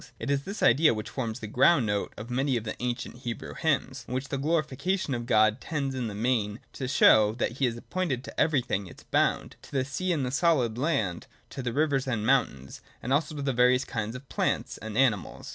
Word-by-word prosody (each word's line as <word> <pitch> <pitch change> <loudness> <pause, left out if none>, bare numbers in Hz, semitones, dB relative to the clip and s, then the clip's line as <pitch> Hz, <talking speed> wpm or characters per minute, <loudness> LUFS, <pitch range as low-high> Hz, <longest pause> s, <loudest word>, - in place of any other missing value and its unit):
It 140 - -3
is 140 0 0
this 200 +2 -5
idea 150 -4 +5
which 110 - -6
forms 115 -5 -4
the - - -5
ground 130 +4 +4
note 105 -1 -1
of 115 +3 -8
many 130 +1 +1
of 115 - -4
the 110 - -4
ancient 125 0 -3
Hebrew 120 -2 -6
hymns, 135 -4 -1
in 125 - -4
which 130 +1 -3
the 140 - -2
glorification 155 +2 0
of 120 -1 -4
God 110 +1 +3
tends 140 -4 -2
in 125 -3 -2
the 105 - -6
main 110 -2 0
to 130 - -4
show 110 -4 +5
that 120 +1 -2
He 135 - +3
has 120 -2 -1
appointed 135 -2 -2
to - - -8
every 145 -4 +3
thing 100 -5 -2
its - - -14
bound: - - 0
to - - -15
the 130 -2 0
sea 185 +7 -2
and 150 -6 0
the 125 - -3
solid 140 -7 +2
land, 110 - -1 0.2
to 135 - -5
the 125 -1 -2
rivers 140 0 +1
and 115 -4 -1
mountains; 110 - 0 0.2
and 125 - 0
also 150 +1 0
to 145 - -4
the 135 -1 0
various 125 +1 +4
kinds 110 +1 -4
of 130 +1 -9
plants - - -1
and 110 0 -6
animals. 120 -7 +1
130 Hz, 230 wpm, -28 LUFS, 115-140 Hz, 0.2 s, idea